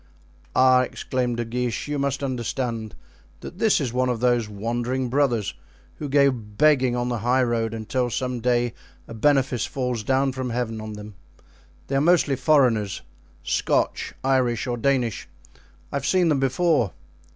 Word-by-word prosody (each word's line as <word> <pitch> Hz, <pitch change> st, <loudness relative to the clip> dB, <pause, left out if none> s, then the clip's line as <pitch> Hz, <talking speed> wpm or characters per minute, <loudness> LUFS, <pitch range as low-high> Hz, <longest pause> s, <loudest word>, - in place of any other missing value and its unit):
"Ah!" 130 Hz, 0 st, +6 dB
exclaimed 125 Hz, -1 st, -2 dB
De 120 Hz, -, -2 dB
Guiche, 120 Hz, +2 st, -3 dB
"you 145 Hz, -1 st, -2 dB
must 140 Hz, 0 st, -1 dB
understand 120 Hz, -3 st, -3 dB, 0.5 s
that 180 Hz, -, -9 dB
this 220 Hz, -2 st, +3 dB
is 130 Hz, -5 st, -2 dB
one 130 Hz, 0 st, +1 dB
of 120 Hz, -2 st, -1 dB
those 120 Hz, -3 st, +1 dB
wandering 120 Hz, +5 st, -2 dB
brothers, 125 Hz, -6 st, +1 dB, 0.4 s
who 150 Hz, -, -5 dB
go 140 Hz, 0 st, +4 dB
begging 125 Hz, +3 st, +2 dB
on 120 Hz, 0 st, -1 dB
the 120 Hz, -2 st, -2 dB
high 125 Hz, +4 st, +2 dB
road 115 Hz, -2 st, 0 dB
until 120 Hz, +3 st, -2 dB
some 125 Hz, 0 st, -2 dB
day 120 Hz, 0 st, +1 dB, 0.3 s
a -, -, -9 dB
benefice 135 Hz, 0 st, +1 dB
falls 125 Hz, -4 st, -2 dB
down 135 Hz, +4 st, +1 dB
from 130 Hz, -1 st, -4 dB
Heaven 115 Hz, -2 st, -3 dB
on 110 Hz, 0 st, -6 dB
them; 105 Hz, 0 st, -9 dB, 0.7 s
they 135 Hz, -, -3 dB
are 135 Hz, -, +3 dB
mostly 160 Hz, -3 st, +3 dB
foreigners—Scotch, 115 Hz, -, 0 dB
Irish 130 Hz, -3 st, +1 dB
or 125 Hz, -2 st, -2 dB
Danish. 120 Hz, -2 st, 0 dB, 0.6 s
I -, -, -1 dB
have 140 Hz, -, -4 dB
seen 180 Hz, -3 st, +3 dB
them 145 Hz, -3 st, +2 dB
before." 135 Hz, -, +1 dB
125 Hz, 155 wpm, -24 LUFS, 115-135 Hz, 0.7 s, Ah